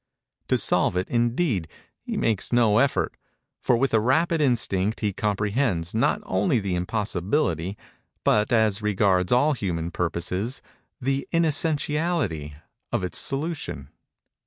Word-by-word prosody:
To - - +2
solve - - +2
it, 90 - -1
indeed, 120 - +1 0.3
he - - -4
makes 110 -4 0
no 115 -3 +4
effort; 140 0 +1 0.4
for 120 - +2
with 135 +1 0
a 110 - +5
rapid 160 +8 +2
instinct 110 -6 +1
he 105 -3 0
comprehends, 105 -3 -1
not 110 - +1
only 95 +6 +1
the 100 -4 -2
impossibility, 95 - -1 0.5
but, 105 0 +2
as 110 -3 +2
regards 95 -3 +2
all 145 +5 +4
human 85 -8 -3
purposes, 90 - -2 0.4
the 135 +1 -1
inessentiality, 150 - 0 0.4
of - - -1
its 90 - -2
solution. 140 - -3
110 Hz, 125 wpm, -25 LUFS, 95-135 Hz, 0.5 s, a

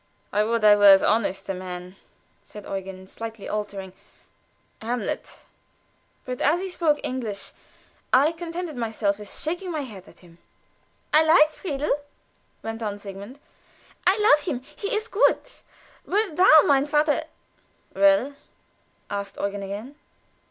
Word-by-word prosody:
"'I 210 - +3
would 230 -1 0
I 210 -1 +8
were 205 -1 +7
as 195 - +6
honest 210 -3 +1
a 195 - -2
man,'" 180 0 -7 0.5
said 210 -1 -12
Eugen, 190 -1 -6
slightly 225 +2 -8
altering 200 -3 -5 0.9
"Hamlet;" 240 +2 -4 0.8
but 250 -1 -5
as 310 +5 +3
he 380 +1 -4
spoke 320 -5 +1
English 225 -6 -4 0.6
I 280 +5 +5
contented 335 -1 -6
myself 220 -4 -1
with 210 -1 -8
shaking 350 +4 -3
my 310 -3 -2
head 210 -9 -10
at - - -17
him. 170 0 -19 0.7
"I 305 - +7
like 315 -1 +5
Friedel," 300 -3 -2 0.7
went 225 +1 -5
on 205 -2 -3
Sigmund. 200 +5 -9 0.7
"I 380 +2 +5
love 300 -9 +4
him; 255 -1 -2
he 405 - -4
is 435 +1 -2
good. 450 +1 +3 0.7
But 400 -4 0
thou, 315 -4 +7
mein 280 0 +3
Vater 295 0 +1 0.4
" - - -38
"Well?" 200 +8 +4 0.8
asked 200 -1 -5
Eugen 200 0 -3
again. 205 +8 -7
230 Hz, 140 wpm, -24 LUFS, 200-305 Hz, 0.9 s, I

